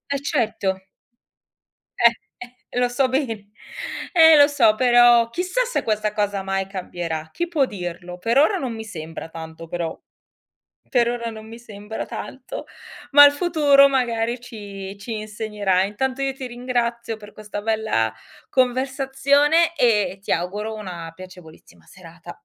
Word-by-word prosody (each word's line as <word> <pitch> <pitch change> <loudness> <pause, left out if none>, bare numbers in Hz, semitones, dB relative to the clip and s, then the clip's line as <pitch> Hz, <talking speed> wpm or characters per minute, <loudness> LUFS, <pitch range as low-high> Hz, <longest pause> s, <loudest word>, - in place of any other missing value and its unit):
E - - +1
certo. 190 -4 -1 1.2
Eh, 235 -1 +6 0.3
eh, 250 0 -23
e 245 - -3
lo 245 - +3
so 260 +2 +1
be 230 -7 -2 0.7
eh 320 -2 +8
lo 285 0 +8
so, 220 -7 +3
però 240 -1 +5
chissà 365 - -1
se - - -2
questa 215 -1 -1
cosa 205 -2 -1
mai 195 0 -2
cambierà. 170 -4 -5
Chi 345 +1 -3
può 305 -6 +2
dirlo? 180 -3 -7
Per 230 +8 0
ora 350 +8 +4
non 255 -8 -3
mi 220 0 -6
sembra 165 -5 -8
tanto, 160 0 -9
però 170 -1 -4 0.9
per 240 -2 +2
ora 235 -1 -3
non 220 0 -10
mi 230 +1 -10
sembra 210 -2 -7
tanto, - - -7 0.5
ma 290 +1 +10
il 285 - +7
futuro 290 -3 +4
magari 240 -3 0
ci 200 -4 -9
ci 220 +1 -5
insegnerà. 210 -3 -1
Intanto 255 +7 -2
io 270 -1 0
ti 265 -1 -7
ringrazio 240 -2 -2
per 210 -1 -13
questa 210 -1 -7
bella 215 - 0 0.4
conversazione 270 +5 +2
e 210 -7 +2
ti - - -5
auguro 205 +6 -2
una 175 -6 -7
piacevolissima 165 - -14
serata. 170 - -13
220 Hz, 145 wpm, -22 LUFS, 195-260 Hz, 1.2 s, ma